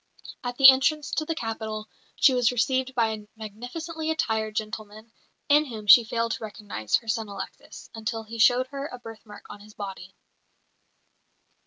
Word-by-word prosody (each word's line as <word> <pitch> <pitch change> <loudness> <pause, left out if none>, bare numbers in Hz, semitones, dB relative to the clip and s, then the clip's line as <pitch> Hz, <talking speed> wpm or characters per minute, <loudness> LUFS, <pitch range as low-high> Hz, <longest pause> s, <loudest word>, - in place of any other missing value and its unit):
At 245 0 -4
the 270 - +9
entrance 285 +2 0
to 310 - -1
the 325 - -2
capital 220 -4 -5 0.3
she 275 - +5
was 245 -2 +3
received 260 +2 0
by 230 -2 +2
a 210 -1 -7
magnificently 250 +10 -6
attired 220 -8 -1
gentleman, 215 +1 -6 0.4
in 295 +1 +4
whom 220 -6 -8
she 210 +4 +9
failed 230 +1 -2
to - - -4
recognise 205 - -3
her 230 - -2
son 220 -1 -1
Alexis, 200 - -9
until 225 0 -4
he 225 +1 -9
showed 245 +3 +5
her 280 0 -5
a 250 - -9
birthmark 225 -3 -12
on 205 - -10
his 210 +1 -16
body. 190 -2 -8
225 Hz, 165 wpm, -26 LUFS, 215-260 Hz, 0.4 s, the